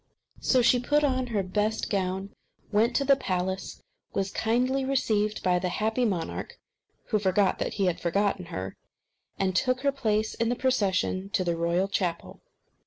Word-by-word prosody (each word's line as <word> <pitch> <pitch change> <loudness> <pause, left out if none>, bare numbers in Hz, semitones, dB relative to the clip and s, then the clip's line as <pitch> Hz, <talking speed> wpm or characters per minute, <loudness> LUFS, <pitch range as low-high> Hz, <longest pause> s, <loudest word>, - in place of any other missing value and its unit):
So 255 -2 +3
she 245 +1 +5
put 295 +4 +2
on 260 -3 +1
her 215 -5 -1
best 210 +4 -1
gown, 190 0 -1 0.4
went 225 +3 +2
to 280 - +2
the 275 0 +6
palace, 190 -6 -3 0.3
was 195 -1 -1
kindly 250 +4 +1
received 215 -6 0
by 180 -1 +3
the 180 0 -1
happy 220 +6 0
monarch, 185 -7 -3 0.5
who 215 - +2
forgot 190 0 +2
that - - -2
he 200 - +1
had 180 -2 0
forgotten 195 +1 0
her, 95 - -5 0.6
and 190 -1 0
took 255 +5 +1
her 280 0 +2
place 220 -5 0
in 230 0 0
the 245 - +1
procession 200 -6 0
to 195 - +2
the 170 -1 0
royal 170 +3 +1
chapel. 180 -4 -3
205 Hz, 170 wpm, -27 LUFS, 185-245 Hz, 0.6 s, the